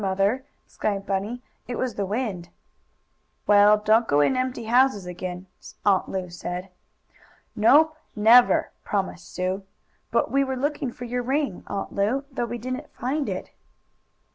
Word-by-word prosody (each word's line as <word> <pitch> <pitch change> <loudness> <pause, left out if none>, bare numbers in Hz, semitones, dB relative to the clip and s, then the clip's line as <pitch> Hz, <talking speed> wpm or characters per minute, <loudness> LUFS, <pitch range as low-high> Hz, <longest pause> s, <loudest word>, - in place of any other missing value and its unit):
Mother," 200 +6 +1 0.2
explained 200 -2 -3
Bunny. 205 +5 -3 0.2
"It 245 - -4
was 255 -3 -1
the 200 -1 -3
wind." 200 -5 -3 1.0
"Well, 205 0 +6
don't 215 +2 +3
go 145 - +3
in 260 - +3
empty 255 -1 -2
houses 240 -3 +3
again," 180 +1 -6 0.4
Aunt 195 -2 +3
Lu 185 -1 -3
said. 180 +2 -5 0.9
"Nope 300 +9 +5 0.2
never!" 230 +3 +5
promised 190 -4 -3
Sue, 185 +2 -2 0.5
"But - - +1
we 275 0 +3
were 265 -1 -3
looking 280 -1 -2
for 245 - -8
your 245 +1 -2
ring, 270 -4 -1
Aunt 200 -1 -4
Lu, 220 +8 0
though 250 -2 -2
we 240 +1 -5
didn't 255 +5 -5
find 275 +4 -2
it." - - -5
220 Hz, 145 wpm, -25 LUFS, 195-255 Hz, 1.0 s, Well